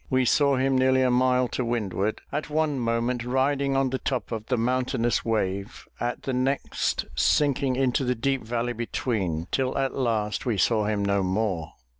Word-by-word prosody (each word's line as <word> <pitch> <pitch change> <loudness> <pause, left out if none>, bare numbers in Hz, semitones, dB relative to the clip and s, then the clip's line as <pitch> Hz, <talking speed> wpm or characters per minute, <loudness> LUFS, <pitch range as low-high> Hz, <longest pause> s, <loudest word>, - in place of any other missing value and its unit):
We 130 -1 +2
saw 140 +2 +3
him 130 0 +2
nearly 130 0 +3
a 125 - +3
mile 125 0 +3
to 125 - -2
windward, 110 -3 -1
at 150 +1 -3
one 150 -2 0
moment 115 +1 0
riding 135 +2 +1
on 135 -1 +1
the 130 - -1
top 130 -3 -3
of 110 -2 -4
the 125 - +1
mountainous 125 0 0
wave, 100 -2 -2
at 120 0 -3
the 135 - -2
next, 130 +2 -1
sinking 135 - +2
into 130 0 +1
the 125 0 0
deep 135 +3 -1
valley 120 +2 -2
between, 105 -8 -2
till 130 -1 0
at 135 -1 0
last 110 -5 -1
we 120 -5 -1
saw 110 +2 +2
him 105 -1 0
no 100 0 +2
more! 95 -3 -1
125 Hz, 180 wpm, -26 LUFS, 110-130 Hz, -, saw